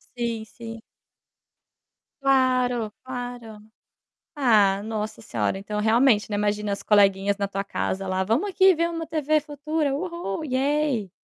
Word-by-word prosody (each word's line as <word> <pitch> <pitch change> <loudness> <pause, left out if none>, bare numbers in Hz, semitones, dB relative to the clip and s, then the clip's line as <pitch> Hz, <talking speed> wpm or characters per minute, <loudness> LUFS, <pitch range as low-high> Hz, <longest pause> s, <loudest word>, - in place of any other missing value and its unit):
Sim, 235 -2 -3
sim. 225 +1 -10 1.4
Claro, 255 -4 +2
claro. 245 -4 -7 0.8
Ah, 210 -8 +4
nossa 215 0 -4
senhora, 210 - -2
então 210 +1 -4
realmente, 220 0 +3
né, 210 - -2
imagina 210 0 -1
as 200 - -3
coleguinhas 200 -1 +3
na 200 -1 -1
tua 195 0 -3
casa 195 -1 -3
lá: 185 0 0
"Vamos 235 - 0
aqui, 385 0 +5
ver 335 0 0
uma 330 -1 -4
TV 310 -1 +1
Futura. 295 0 -2
Uhul, 340 - -4
yeh". 270 - 0
235 Hz, 135 wpm, -24 LUFS, 210-285 Hz, 1.4 s, aqui